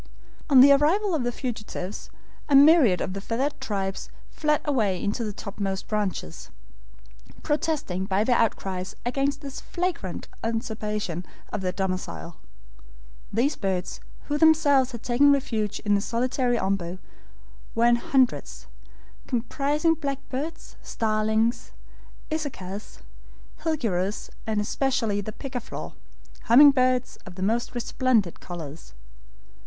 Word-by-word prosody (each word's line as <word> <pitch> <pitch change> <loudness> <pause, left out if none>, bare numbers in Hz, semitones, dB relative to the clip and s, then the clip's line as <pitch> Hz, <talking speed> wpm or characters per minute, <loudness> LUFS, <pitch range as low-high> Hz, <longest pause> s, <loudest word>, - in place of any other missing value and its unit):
On 265 -3 +8
the 280 +2 +9
arrival 340 +8 +3
of 300 -6 0
the 245 - 0
fugitives 215 -6 -5 0.4
a 285 - +5
myriad 280 - +7
of 185 - -2
the 195 - -5
feathered 265 +7 -2
tribes 195 -6 -3 0.2
fled 300 -1 +1
away 215 - +1
into 210 +5 -1
the 215 - -2
topmost 195 -1 -4
branches, 200 - -3 0.9
protesting 295 - -1
by 195 +1 +1
their 245 +2 +2
outcries 190 -4 -1
against 275 +3 0
this 275 -2 -7
flagrant 345 - -3 0.2
usurpation 215 -5 -3 0.3
of 210 - -2
their 185 -1 -1
domicile. 185 -3 -4 0.9
These 250 +8 +1
birds, 190 -2 -2 0.2
who 295 0 -2
themselves 290 -5 +5
had 235 -2 -8
taken 265 +4 +4
refuge 225 -7 0
in 205 -1 +1
the 200 - +3
solitary 245 +2 0
OMBU, 190 -4 -1 0.8
were 230 - +3
in 240 0 +5
hundreds, 235 - 0 0.6
comprising 285 +6 +1
blackbirds, 280 +1 -5
starlings, 220 +1 0 0.6
isacas, 215 -11 -5 0.5
HILGUEROS, 215 - -2 0.2
and 215 -1 0
especially 225 -1 0
the 215 - -6
pica 260 +3 -5
flor, - - -7 0.5
humming 280 +5 +8
birds 255 -1 +1
of 185 -1 -10
most 225 +6 -1
resplendent 240 -5 +1
colors. 160 - -9
230 Hz, 120 wpm, -26 LUFS, 195-275 Hz, 0.9 s, the